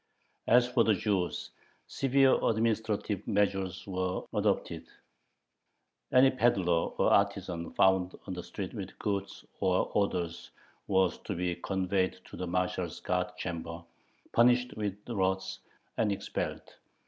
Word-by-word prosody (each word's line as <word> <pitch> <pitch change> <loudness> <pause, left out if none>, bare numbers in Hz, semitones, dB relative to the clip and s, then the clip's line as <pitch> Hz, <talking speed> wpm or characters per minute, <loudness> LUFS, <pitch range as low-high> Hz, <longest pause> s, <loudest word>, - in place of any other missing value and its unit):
As 120 +1 +5
for 125 -1 +3
the 110 -2 +3
Jews, 95 -3 -1 0.3
severe 135 0 +3
administrative 110 -3 0
measures 95 -3 0
were 95 -1 -2
adopted: - - 0 1.2
any 130 +1 +6
peddler 95 -10 +2
or - - +3
artisan 85 -1 0
found 95 -1 +3
on 95 - -5
the 90 - -5
street - - -6
with - - -7
goods 100 -1 -3
or 95 -1 +1
orders 90 -4 -1 0.4
was 95 -3 +2
to - - -5
be 90 0 -1
conveyed 95 +1 -1
to - - -7
the 90 - -4
marshal's 90 -1 -1
guard 90 0 -2
chamber, 85 -1 -5 0.5
punished 125 +1 +4
with 105 -2 -3
rods, 95 -3 -1 0.4
and 110 -2 +2
expelled. 100 - -4
95 Hz, 125 wpm, -30 LUFS, 90-110 Hz, 1.2 s, any